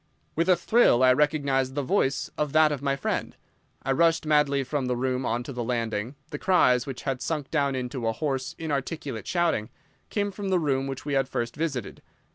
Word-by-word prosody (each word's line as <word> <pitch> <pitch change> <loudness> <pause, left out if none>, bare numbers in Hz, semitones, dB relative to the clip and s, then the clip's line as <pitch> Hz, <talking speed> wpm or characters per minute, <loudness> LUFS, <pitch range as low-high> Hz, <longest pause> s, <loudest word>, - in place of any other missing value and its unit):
With 165 +3 +1
a 185 - +7
thrill 175 - +4
I 130 0 +7
recognised 140 -2 +1
the 145 - -1
voice 135 -3 0
of 150 -2 -2
that 155 -1 +5
of 145 -3 -3
my 140 -1 0
friend. 135 - -3 0.5
I 135 - 0
rushed 165 +3 +3
madly 150 -2 +3
from 130 0 -2
the 125 - 0
room 130 +1 -1
on 120 +2 -1
to 135 - -7
the 120 -1 -3
landing. 115 0 -2 0.2
The 145 - -5
cries, 125 -10 +3
which 135 -2 -6
had 135 -2 -2
sunk 150 -4 -3
down 140 -3 +1
into 125 -2 -3
a - - +2
hoarse, 135 +1 -3
inarticulate 145 - -4
shouting, 170 -11 0 0.4
came 205 -1 -1
from 195 0 -5
the 185 - +3
room 135 -5 0
which 135 0 -6
we 145 - -2
had 135 -1 +1
first 120 0 -3
visited. 145 -7 -3
135 Hz, 205 wpm, -26 LUFS, 130-155 Hz, 0.5 s, a